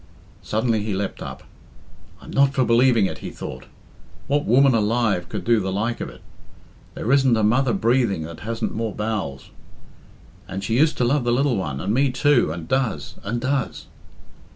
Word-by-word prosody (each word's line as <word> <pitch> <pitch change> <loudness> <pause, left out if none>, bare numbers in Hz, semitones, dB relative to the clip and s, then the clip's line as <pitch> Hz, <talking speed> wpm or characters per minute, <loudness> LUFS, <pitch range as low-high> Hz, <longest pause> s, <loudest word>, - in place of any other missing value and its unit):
Suddenly 110 0 0
he 105 -2 -2
leapt 100 0 -4
up. - - -7 0.8
"I'm - - -12
not 140 0 +3
for 130 - +3
believing 120 -2 +4
it," - - -4
he - - -6
thought. - - -8 0.6
"What 145 +1 0
woman 135 +3 +5
alive 110 -4 +1
could - - -4
do 115 -1 +3
the 95 -1 -2
like 110 +5 -2
of - - -4
it? - - -14 0.7
There 120 - -2
isn't 135 -4 +4
a 110 - +1
mother 120 +4 +3
breathing 115 -4 +1
that 80 +1 -8
hasn't 115 +1 -3
more 110 -3 -3
bowels. 105 -11 -4 1.0
And 95 +1 -5
she 115 - -1
used 155 +1 +3
to - - +1
love 135 +2 +2
the 120 - +1
lil 130 +1 +2
one, 75 -9 -3
and 100 +7 -1
me 135 +3 +3
too 130 - +2
and 80 -1 -6
does, 110 - -1
and 115 +4 -2
does." 130 +1 -2
115 Hz, 180 wpm, -22 LUFS, 100-130 Hz, 1.0 s, woman